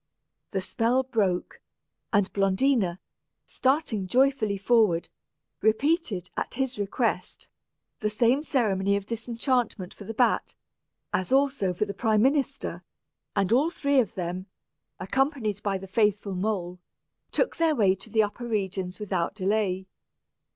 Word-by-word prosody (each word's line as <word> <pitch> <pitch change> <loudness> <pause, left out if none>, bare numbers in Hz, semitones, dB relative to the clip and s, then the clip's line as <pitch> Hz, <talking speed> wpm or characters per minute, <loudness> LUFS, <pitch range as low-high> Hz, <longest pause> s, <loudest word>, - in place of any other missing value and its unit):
The 190 - -2
spell 240 +6 +1
broke, 205 -8 -1 0.5
and 200 -3 +2
Blondina, 195 -1 +2 0.5
starting 260 -8 0
joyfully 245 -3 +2
forward, 205 -5 +3 0.5
repeated, 220 - +1
at - - -3
his 265 -3 -2
request, 205 +4 -2 0.5
the 215 - 0
same 235 +6 +2
ceremony 200 -9 +1
of 200 -1 -2
disenchantment 230 -3 -1
for 205 - -11
the 225 - -6
bat, 245 +2 +1 0.6
as 185 +3 -1
also 270 -8 +2
for 180 +4 -1
the 200 - -5
prime 215 +1 +2
minister; 275 +1 0 0.5
and 195 -1 +1
all 275 +7 +4
three 280 -5 +1
of 225 -6 0
them, 180 +1 -4 0.5
accompanied 225 -1 0
by 200 -2 0
the 190 - -9
faithful 205 0 +1
mole, 180 -2 -2 0.5
took - - 0
their 325 -2 +3
way 200 -6 +4
to 195 +4 -10
the 220 0 +3
upper 225 +4 -4
regions 190 -4 -2
without 190 -3 -2
delay. 190 -2 0
210 Hz, 130 wpm, -27 LUFS, 190-250 Hz, 0.6 s, all